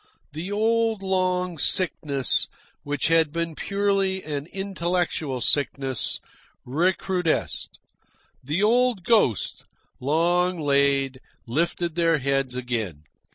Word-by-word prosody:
The 165 +6 -5
old 225 0 +1
long 180 -2 0
sickness, 145 -6 +2 0.3
which 145 0 -1
had 165 -2 +4
been 170 0 -2
purely 195 +1 0
an 145 -1 -4
intellectual 175 -8 -2
sickness, 135 -3 +1 0.5
recrudesced. 175 +4 -1 0.7
The 155 +9 -1
old 240 -2 +3
ghosts, 200 - +2 0.4
long 175 +6 +1
laid, 140 -2 +2 0.3
lifted 170 +6 -1
their 165 -1 +2
heads 135 -2 0
again. 115 - -3
165 Hz, 95 wpm, -24 LUFS, 140-190 Hz, 0.7 s, had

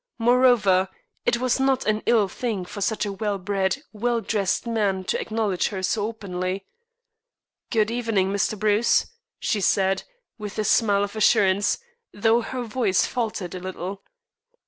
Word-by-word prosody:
Moreover, 230 -6 +4 0.4
it 235 - +3
was 255 +1 0
not 265 -1 +2
an 215 0 +1
ill 225 -4 +4
thing 205 -2 -3
for 205 - -8
such 215 +1 0
a 200 - -3
well 205 0 -2
bred, 195 +7 -1
well 235 +2 0
dressed 210 -1 -1
man 205 -5 0
to - - -1
acknowledge 215 -4 0
her 190 -3 -5
so 205 +2 0
openly. 190 -3 -4 1.0
"Good 220 -2 +1
evening, 225 -5 0
Mr. 200 +2 0
Bruce," 215 +2 +3 0.3
she 210 - -1
said, 195 0 +2 0.4
with 210 -1 -6
a 215 - +1
smile 205 -1 +3
of 205 +1 -5
assurance, 205 -2 +3 0.3
though 225 +3 +2
her 250 +2 -4
voice 220 -5 +1
faltered 215 -7 -3
a 185 - -5
little. 185 +1 -6
210 Hz, 150 wpm, -24 LUFS, 195-230 Hz, 1.0 s, Moreover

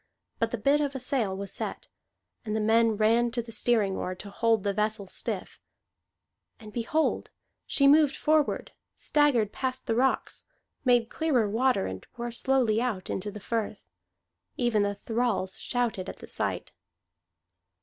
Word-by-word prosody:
But 230 - +1
the 240 - -3
bit 280 +7 +3
of 285 -2 -2
a - - -2
sail 240 -7 -1
was 200 0 -5
set, - - -4 0.6
and 215 -2 -3
men 225 0 +4
ran 230 +3 +3
to 240 - 0
the 230 - -11
steering 215 -3 +1
oar 185 - -3
to 200 +2 -10
hold 225 -1 +2
the 200 -1 0
vessel 210 0 -1
stiff; 185 - -4 1.0
and 215 -2 -12
behold, 275 +7 0 0.4
she 275 - +3
moved 295 0 +5
forward, 305 -1 +1 0.3
staggered 275 -9 +2
past 260 +1 -3
the 230 - 0
rocks, 260 +3 0 0.4
made 245 -3 +3
clearer 275 -9 +1
water, 240 - +2
and 95 0 -6
wore 240 0 -3
slowly 240 -2 +2
out 220 -7 -2
into 200 +2 -3
the 210 +1 -8
firth. 225 +1 -3 0.7
Even 240 -4 +2
the 205 0 0
thralls 220 -3 -1
shouted 230 -7 -2
at - - -8
the - - -11
sight. - - -2
230 Hz, 155 wpm, -28 LUFS, 210-255 Hz, 1.0 s, moved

